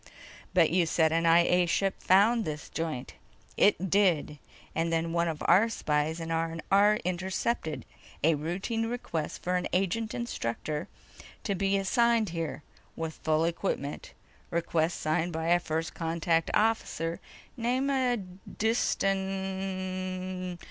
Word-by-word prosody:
"But 165 -4 +5
you 175 -1 +3
said 160 0 +3
an 165 +1 +2
I 165 +1 +7
A 180 0 +3
ship 195 +3 +1
found 215 +5 +4
this 150 -4 -5
joint." 160 -6 -4 0.4
"It 190 -3 +3
did. 175 -7 +2 0.3
And 165 +1 0
then 165 0 0
one 170 0 +2
of 160 -2 -3
our 220 +5 +5
spies 155 -5 -1
in 165 0 -5
R&R 165 +6 +2
intercepted 185 0 -2 0.4
a 165 +2 +5
routine 190 +9 -2
request 195 -10 -4
for 180 0 +1
an 180 - -2
agent 210 +4 0
instructor 150 - -3 0.6
to 200 - 0
be 195 +1 +1
assigned 230 +2 +2
here 160 -4 -4 0.3
with 160 -1 -5
full 155 +1 +2
equipment. 170 -4 -3 0.4
Request 170 0 0
signed 160 +3 0
by 160 +1 -2
a 175 0 +5
First 160 -1 -3
Contact 165 0 0
officer 210 -6 0 0.4
name 250 +2 0
of 240 -9 -2
Diston... 190 -3 -1
180 Hz, 130 wpm, -29 LUFS, 165-195 Hz, 0.6 s, I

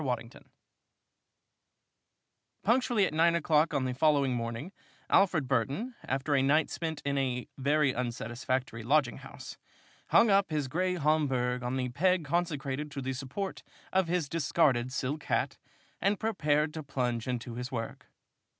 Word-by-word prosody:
WADDINGTON 125 -3 -4 2.1
Punctually 235 -2 +3
at - - -3
nine 170 +2 +4
o'clock 160 -1 +3
on 140 -4 0
the 130 - -1
following 140 -1 +3
morning, 115 +7 -4 0.4
Alfred 180 -8 +4
Burton, 135 - -1
after 135 +2 -1
a 135 - +4
night 145 +3 +3
spent 160 -3 -4
in 140 0 +1
a 125 -2 -1
very 145 0 +2
unsatisfactory 120 0 -3
lodging 135 +1 +2
house, - - -10 0.5
hung 225 - +5
up 195 0 +4
his 150 -4 -1
gray 180 +6 0
Homburg 135 -6 +1
on 125 +1 -2
the 125 -1 -1
peg 180 +6 +2
consecrated 150 -3 -1
to 145 -2 -5
the 130 +1 -2
support 140 +10 -5 0.3
of 190 -2 +3
his 170 -3 0
discarded 140 -5 +1
silk 140 +3 -3
hat, - - 0 0.4
and 200 +2 +2
prepared 150 -8 +1
to 160 - -5
plunge 125 -5 -2
into 125 -1 -3
his 125 +3 -5
work. 115 -3 -5
140 Hz, 145 wpm, -30 LUFS, 125-165 Hz, 2.1 s, hung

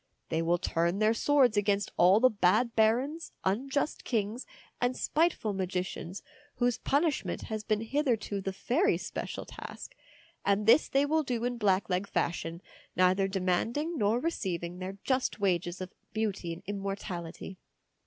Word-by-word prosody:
They 165 0 0
will 170 +1 +2
turn 170 +1 0
their 215 +1 +3
swords 255 -3 +3
against 205 0 +1
all 185 +4 +6
the 255 +2 +5
bad 215 +4 +2
barons, 255 +9 +1
unjust 270 +10 0
kings, 225 +1 -2 0.3
and 245 +1 +1
spiteful 310 -10 +1
magicians, 185 -1 -3 0.3
whose 245 -1 +1
punishment 295 +1 0
has 215 -2 -4
been 215 -1 0
hitherto 225 -5 0
the 195 - -2
fairies' 275 - +1
special - - -5
task; - - -9 0.5
and 200 +1 +2
this 230 +8 +6
they 275 +1 +3
will 315 +2 +2
do 245 -5 -2
in 245 -1 -2
blackleg 195 -2 +1
fashion, 170 -1 -2 0.3
neither 185 +1 +3
demanding 195 - 0
nor 220 -2 +2
receiving 180 - -3
their 190 +1 -5
just 260 -3 0
wages 180 -2 0
of 185 0 -6 0.2
beauty 210 -6 -2
and 165 +3 -7
immortality. 195 -3 -5
205 Hz, 145 wpm, -30 LUFS, 185-245 Hz, 0.5 s, all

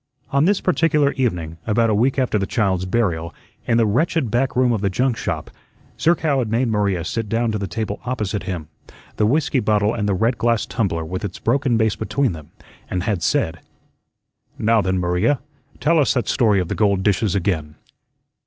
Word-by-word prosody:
On 140 +2 +3
this 200 +2 +2
particular 160 -5 +2
evening, 85 -11 -2
about 115 +1 +2
a - - +2
week 125 +7 +2
after 125 -5 +1
the 95 - -2
child's 95 -6 0
burial, 85 -6 -1 0.3
in 115 - +3
the 115 - +4
wretched 130 +3 +1
back 130 +3 0
room 125 -1 +3
of 110 -4 0
the 100 - +1
Junk 125 +6 0
shop, - - -4 0.5
Zerkow 160 -4 +2
had 120 -4 -1
made 115 +2 +1
Maria 100 -5 0
sit 115 +3 -3
down 115 +1 0
to 105 - -2
the 100 - -3
table 105 +3 -4
opposite 110 -5 -2
him 85 -5 -4 0.5
the 105 - +3
whiskey 145 +2 +1
bottle 105 -1 +1
and 105 -2 -1
the 100 - +1
red 115 +6 0
glass 115 -1 +1
tumbler 90 -9 -2
with 90 +5 -5
its 100 -3 -4
broken 130 0 +1
base 110 -2 +1
between 130 +2 0
them 80 -3 -9 0.4
and 90 -2 -2
had 100 -4 -1
said: - - 0 1.0
"Now, 110 0 +3
then, 95 -1 0
Maria, 90 +9 +1 0.4
tell 165 +1 +3
us 140 - +2
that 125 - 0
story 110 -6 +3
of 90 - -1
the - - -2
gold 100 -3 +1
dishes 100 -1 +1
again." 80 -6 -1
110 Hz, 195 wpm, -21 LUFS, 95-125 Hz, 1.0 s, the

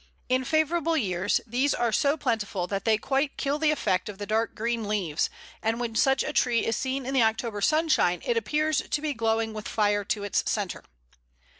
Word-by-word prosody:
In 255 0 +2
favourable 320 +3 +1
years 185 - 0
these 255 +5 +1
are 235 -1 0
so 280 +7 +2
plentiful 215 - -1
that 195 +1 -4
they 220 -1 +4
quite 275 +5 -1
kill 285 +2 -1
the 315 -1 +3
effect 190 -11 0
of 205 - -8
the 205 - -5
dark 220 +2 0
green 230 -1 -2
leaves, 185 -8 0 0.3
and 225 +1 0
when 235 -2 -3
such 265 +4 +3
a - - -4
tree 240 -2 +2
is 225 - 0
seen 265 0 -2
in 265 - -3
the 265 - +4
October 220 -1 0
sunshine, 305 - +2
it 240 - +1
appears 300 +7 +1
to - - -2
be 300 -1 -2
glowing 225 -1 0
with 215 -1 -6
fire 205 -1 +1
to 205 0 -2
its 205 - 0
centre. 205 -4 -2
230 Hz, 200 wpm, -27 LUFS, 210-275 Hz, 0.3 s, they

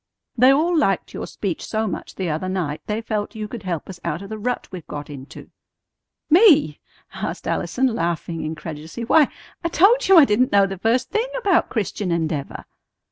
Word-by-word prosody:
"They 255 +2 +6
all 325 +6 +2
liked 195 - +1
your - - -5
speech 190 -5 -4
so 220 0 -2
much 205 - -5
the 190 - -3
other 165 +4 -2
night 170 -6 -3
they 215 +1 -2
felt 215 -2 -3
you 215 -1 -4
could 230 +1 -7
help 175 -5 -4
us 185 -2 -9
out 170 +2 -3
of 195 - -10
the 220 0 -6
rut 245 +3 -2
we've 180 -4 -9
got 145 0 -7
into." 135 -1 -11 0.8
"Me?" 310 - +5 0.3
asked - - -5
Allison, 265 - 0
laughing 170 - -2
incredulously. 160 +6 -6
"Why, 300 +4 +5 0.4
I - - +1
told 430 +9 +4
you 385 -1 +7
I 310 - +9
didn't 250 +2 +2
know 200 -1 +5
the 195 -1 -6
first 240 +5 +1
thing 445 +3 0
about 400 -8 +2
Christian 205 -4 -2
Endeavor." 160 -4 -3
210 Hz, 190 wpm, -22 LUFS, 170-260 Hz, 0.8 s, I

